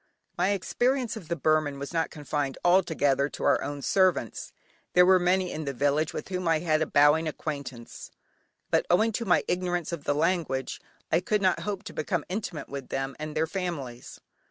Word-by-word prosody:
My 180 +2 +1
experience 240 +5 0
of 200 -8 -9
the 170 - -1
Burman 155 -1 +1
was 140 +4 -6
not 165 -1 0
confined 145 -2 -3
altogether 160 -6 +3
to - - -7
our - - +3
own 145 -1 -5
servants, 185 - +1 0.4
there 180 0 +7
were 185 0 +6
many 180 +1 +1
in 155 0 -5
the 140 -1 -3
village 145 +4 +1
with - - -6
whom 180 -2 -2
I 165 -1 +4
had 155 -1 +1
a 160 - +1
bowing 150 +3 +4
acquaintance, 140 -6 -6 0.6
but - - +2
owing 215 +6 +4
to 230 +2 -3
my 180 - +3
ignorance 175 -2 -1
of 165 -4 -5
the 145 - +1
language 150 -5 -1 0.3
I 165 - +4
could 205 +3 0
not 185 - +3
hope 205 -1 -4
to 220 - -8
become 155 +1 -2
intimate 185 -5 -4
with 140 -2 -7
them 135 0 -3
and 155 0 -5
their 160 - +2
families. 160 -9 -5
160 Hz, 190 wpm, -27 LUFS, 145-185 Hz, 0.6 s, there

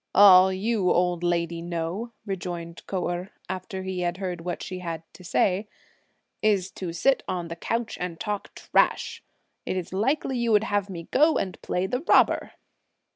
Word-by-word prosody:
"All 190 -2 +9
you 195 0 0
old 175 -1 +2
lady 170 -1 0
know," 170 +7 -3
rejoined 175 -4 -5
Kou 185 -2 -1
Erh, 175 +2 -3 0.2
after 190 0 -5
he 190 -1 -3
had 175 0 -1
heard 180 -3 -4
what 175 0 -4
she 185 -1 -5
had 165 -3 -5
to 185 - -14
say, 190 +3 +1 0.7
"is 200 -3 +2
to 180 -3 -5
sit 260 +11 +2
on 175 -2 -3
the 165 - -4
couch 230 +6 -3
and 175 -2 -4
talk 205 +2 -4
trash! - - +1 0.4
Is 185 -2 -3
it - - -12
likely 260 +5 0
you 235 -1 +1
would 210 0 +5
have 205 -2 0
me 170 -3 -6
go 310 +3 +4
and 185 - -3
play 180 +1 -1
the 250 +6 -1
robber?" - - +3
185 Hz, 175 wpm, -26 LUFS, 175-205 Hz, 0.7 s, All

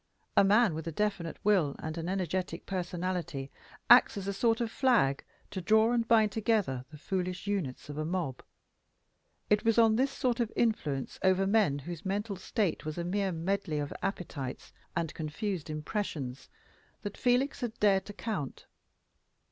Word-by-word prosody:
A - - +7
man 210 0 +5
with 160 +1 -5
a - - -2
definite 195 -2 -1
will 185 -9 +3
and 155 0 -5
an 170 +1 -3
energetic 185 -2 -2
personality 175 -6 -3 0.4
acts 240 -3 +7
as 195 -1 -4
a 200 - -1
sort 225 +3 +2
of 230 -2 -1
flag 230 - +3 0.3
to 190 - -4
draw 220 +5 +4
and 235 -2 +1
bind 220 -3 +5
together 200 - 0
the 150 - -11
foolish 180 +3 -3
units 190 -11 -2
of 145 +1 -6
a - - 0
mob. 160 -6 -2 1.1
It 210 0 +4
was 225 0 +3
on 225 -1 +5
this 265 +3 +3
sort 255 -3 -1
of 230 -2 0
influence 150 - 0
over 190 0 +3
men 195 -8 +3
whose 160 +3 -7
mental 200 +2 -2
state 190 -1 -1
was 155 +1 -5
a 170 - -1
mere 195 +2 0
medley 175 -1 -1
of 145 -1 -3
appetites 170 -9 -4 0.2
and 165 -2 -1
confused 165 +2 -3
impressions, 150 - -4 0.5
that 205 0 -4
Felix 255 +3 +1
had 235 -2 -4
dared 195 -2 +3
to 205 - -7
count. 200 - -4
190 Hz, 165 wpm, -31 LUFS, 160-215 Hz, 1.1 s, A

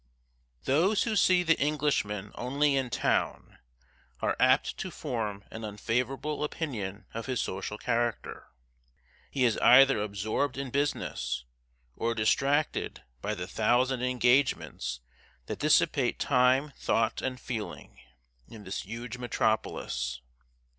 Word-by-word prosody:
Those 175 +10 +3
who 225 -2 -1
see 180 -2 +4
the 165 -1 +3
Englishman 135 -9 0
only 140 +3 +1
in 130 -2 0
town, - - -1 0.6
are - - 0
apt 130 +2 +3
to 190 - -3
form 110 - -4
an 110 - -7
unfavorable 125 +8 -2
opinion 110 - -4
of 115 +2 -5
his 130 -3 -1
social 95 +2 -3
character. 120 0 -2 0.8
He 130 -2 +1
is 115 - +2
either 135 -3 +7
absorbed 110 +7 -2
in 135 -2 -4
business, 140 - -2 0.5
or 115 +1 -1
distracted 140 +7 +1 0.2
by - - -2
the 90 - -4
thousand 120 +6 +1
engagements 125 - +1 0.4
that - - -5
dissipate - - +3
time, 130 +3 +3
thought, 115 0 0
and 130 -1 -3
feeling, 105 - -6 0.5
in 110 -2 -11
this 95 0 -4
huge 115 +4 -7
metropolis. 110 - -1
125 Hz, 120 wpm, -29 LUFS, 110-140 Hz, 0.8 s, either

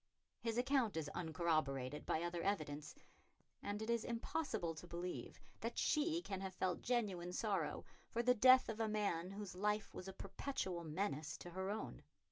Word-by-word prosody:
His 230 -1 -1
account 245 - +3
is 155 -2 -1
uncorroborated 155 -5 0
by 160 - +1
other 175 0 -1
evidence, 155 -7 -1 0.7
and 205 +1 -2
it 220 - -4
is 235 -1 +2
impossible 235 - -1
to 165 +2 -9
believe 175 +1 -4 0.2
that 230 +3 -3
she 325 +3 +2
can 195 -2 -3
have 190 -1 -4
felt 185 -1 0
genuine 200 -8 0
sorrow 195 -7 0 0.2
for 235 - 0
the 250 +1 +6
death 255 +2 +8
of 225 0 -3
a 225 - +2
man 200 -5 0
whose 200 0 -5
life 210 +2 0
was 185 - -6
a 190 - -5
perpetual 190 -3 -3
menace 155 -2 -1
to 175 - -8
her 190 +2 -2
own. 210 - -3
195 Hz, 170 wpm, -40 LUFS, 170-225 Hz, 0.7 s, death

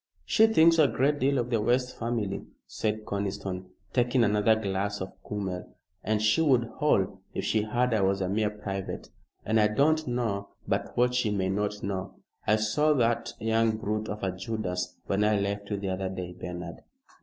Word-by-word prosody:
She 220 0 +5
thinks 165 -6 +5
a 150 - +7
great 145 +3 +1
deal 140 +1 +2
of 120 0 -1
the 115 -3 +2
West 125 +3 +1
family," 115 -4 -2 0.2
said 110 0 -2
Conniston, 95 -2 -3 0.3
taking 120 0 +3
another 105 +1 +4
glass 100 -1 -2
of 95 - -5
kümmel, 95 -3 -5 0.3
"and 110 0 +1
she 110 +9 +4
would 125 -7 +3
howl 100 -10 +2
if - - -2
she 110 - +2
heard 120 +3 0
I 110 - +2
was 95 0 +2
a 95 - -1
mere 105 +2 +1
private. 100 -2 -5 0.4
And 110 +1 +3
I 105 - +5
don't 155 +8 +2
know 115 -5 -1 0.2
but - - -2
what 125 +1 +3
she 125 -3 +1
may 95 -2 0
not 105 +1 -2
know. 95 -1 -3 0.3
I 110 - +5
saw 110 +9 +2
that 120 -3 +1
young 110 0 +2
brute 110 0 -2
of 105 0 -5
a 95 - +1
Judas 95 -2 -3
when 100 +1 +1
I 105 -1 +3
left 100 0 -2
you 105 - -1
the 100 -1 -3
other 95 0 -2
day, 90 -2 -5
Bernard." 90 -2 -6
105 Hz, 190 wpm, -28 LUFS, 100-120 Hz, 0.4 s, a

